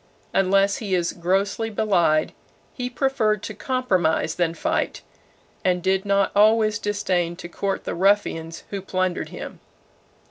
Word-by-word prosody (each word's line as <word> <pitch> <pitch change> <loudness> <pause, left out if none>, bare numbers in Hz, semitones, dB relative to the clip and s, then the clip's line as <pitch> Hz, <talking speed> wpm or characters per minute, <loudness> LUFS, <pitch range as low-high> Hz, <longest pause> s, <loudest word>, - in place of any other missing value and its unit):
Unless 195 +1 +3
he 200 -4 -1
is 175 -1 0
grossly 195 +5 0
belied, 175 -8 +2 0.4
he 250 -1 -4
preferred 240 -6 0
to 215 - -5
compromise 190 -10 0
than 170 -1 0
fight, 315 - -1 0.6
and 180 -1 +1
did 190 +1 +1
not 200 0 +2
always 215 +1 +4
disdain 185 -5 -1
to 175 - -8
court 195 +2 -3
the - - -3
ruffians 170 -4 +1
who 200 -1 -3
plundered 185 -1 -2
him. - - -8
195 Hz, 135 wpm, -23 LUFS, 175-215 Hz, 0.6 s, always